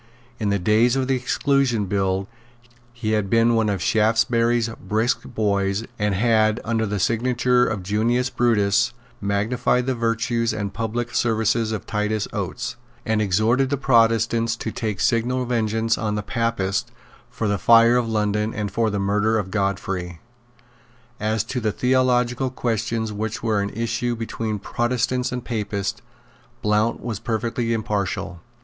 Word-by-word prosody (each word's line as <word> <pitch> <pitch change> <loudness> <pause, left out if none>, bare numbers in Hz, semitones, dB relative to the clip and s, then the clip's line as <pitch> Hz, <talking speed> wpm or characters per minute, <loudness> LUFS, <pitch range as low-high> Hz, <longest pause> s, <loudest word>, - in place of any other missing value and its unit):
In 105 -3 0
the 100 - +2
days 110 +6 +3
of 130 -1 0
the 135 - +2
Exclusion 130 -3 +1
Bill 95 0 -1 0.6
he 120 -3 -3
had 105 -3 0
been 115 +2 +4
one 110 -2 +2
of 100 -3 -1
Shaftesbury's 115 +1 +2
brisk 110 +3 0
boys, 100 -2 0
and 105 -1 +1
had, 110 +1 +3
under 110 -1 0
the 105 +1 -2
signature 125 +3 +2
of 100 -4 -3
Junius 115 +6 0
Brutus, 105 -5 +2 0.3
magnified 115 +5 0
the 130 - 0
virtues 115 0 0
and 100 -2 -4
public 115 +1 -3
services 110 -1 +1
of 110 -3 -4
Titus 105 0 -1
Oates, 100 +4 -4 0.3
and 110 -1 +1
exhorted 110 +7 +2
the 140 - 0
Protestants 115 -2 +2
to 110 - -5
take 105 -3 -3
signal 125 +2 +1
vengeance 115 -1 0
on 105 -2 -1
the 105 - -2
Papists 105 -4 -1 0.4
for 110 - -3
the 100 -1 0
fire 115 +3 +6
of 120 -2 +1
London 105 0 0
and 105 -2 -3
for 115 +2 +1
the 105 - -2
murder 105 +3 +1
of 95 -3 -3
Godfrey. 95 -4 -2 1.0
As 110 0 0
to 125 +3 -3
the 110 -2 0
theological 125 +1 +1
questions 115 -2 -2
which 110 +2 -4
were 110 -3 +1
in 100 - -2
issue 120 +2 -2
between 115 -1 -3
Protestants 125 +4 -1
and 125 -1 -4
Papists, 105 -3 -3 0.6
Blount 105 +2 +1
was 115 -4 -4
perfectly 115 +1 -2
impartial. 105 -5 -2
110 Hz, 150 wpm, -22 LUFS, 105-120 Hz, 1.0 s, fire